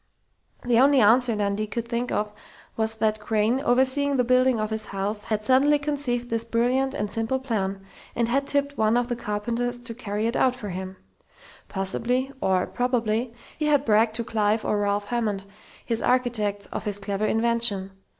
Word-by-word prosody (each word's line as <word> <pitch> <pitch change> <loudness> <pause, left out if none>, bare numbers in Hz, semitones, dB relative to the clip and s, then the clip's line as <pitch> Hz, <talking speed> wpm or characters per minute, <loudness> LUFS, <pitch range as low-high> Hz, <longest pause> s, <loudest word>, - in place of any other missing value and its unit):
The 240 -1 +3
only 275 +1 +5
answer 235 +2 +4
Dundee 205 +1 -1
could 235 +2 -4
think 235 +1 -2
of 210 0 -1 0.4
was 220 0 -1
that 215 -1 0
Crain, 215 +3 +1
overseeing 270 +2 +2
the 250 - +3
building 255 0 +3
of 215 0 -2
his 220 0 -1
house, 205 +2 -4
had 215 -1 -2
suddenly 270 +5 +4
conceived 275 -5 -2
this 230 0 +1
brilliant 250 +4 0
and 210 - -1
simple 225 +5 -1
plan, 200 -7 -3 0.3
and 235 -1 +1
had 275 +4 0
tipped 285 0 0
one 220 +2 +3
of 245 0 0
the 240 - -1
carpenters 235 +2 -2
to 235 -1 -7
carry 215 -2 -3
it 230 - -1
out 255 -1 +2
for 210 -5 -7
him. 185 +1 -6 0.7
Possibly, 245 +7 -1
or 185 -1 +2
probably, 240 -1 -1 0.3
he 305 - 0
had 290 -2 +3
bragged 220 0 +3
to 235 - -1
Clive 215 -1 0
or 210 - +1
Ralph 205 0 0
Hammond, 215 -5 -1 0.4
his 230 -2 0
architects, 220 -5 0
of - - -5
his 205 -1 -1
clever 200 +1 -2
invention. 225 -4 0
230 Hz, 180 wpm, -25 LUFS, 210-250 Hz, 0.7 s, only